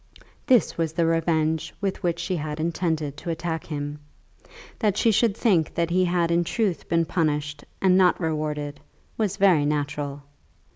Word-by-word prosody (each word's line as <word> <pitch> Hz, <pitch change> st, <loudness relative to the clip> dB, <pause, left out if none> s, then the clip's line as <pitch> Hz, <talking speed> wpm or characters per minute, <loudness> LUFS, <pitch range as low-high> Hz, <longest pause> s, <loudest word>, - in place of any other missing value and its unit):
This 250 Hz, -9 st, +3 dB
was 160 Hz, -1 st, 0 dB
the 165 Hz, 0 st, +1 dB
revenge 160 Hz, -1 st, 0 dB
with 195 Hz, -2 st, -2 dB
which 170 Hz, -1 st, 0 dB
she 175 Hz, +2 st, -2 dB
had 150 Hz, -1 st, -4 dB
intended 160 Hz, -3 st, -1 dB
to 170 Hz, -, -6 dB
attack 165 Hz, 0 st, -3 dB
him. 145 Hz, -1 st, -4 dB, 0.8 s
That 210 Hz, -3 st, +1 dB
she 230 Hz, -, +4 dB
should 220 Hz, 0 st, +2 dB
think 180 Hz, -9 st, +2 dB
that 170 Hz, 0 st, 0 dB
he 185 Hz, +1 st, +3 dB
had 175 Hz, -1 st, +1 dB
in 170 Hz, +1 st, +3 dB
truth 200 Hz, 0 st, -2 dB
been 165 Hz, 0 st, +2 dB
punished 150 Hz, -3 st, -1 dB, 0.2 s
and 185 Hz, -1 st, +4 dB
not 180 Hz, -2 st, +4 dB
rewarded, 150 Hz, -3 st, -3 dB, 0.4 s
was 210 Hz, -3 st, -1 dB
very 190 Hz, -7 st, +4 dB
natural. 145 Hz, -1 st, -2 dB
165 Hz, 160 wpm, -25 LUFS, 150-180 Hz, 0.8 s, she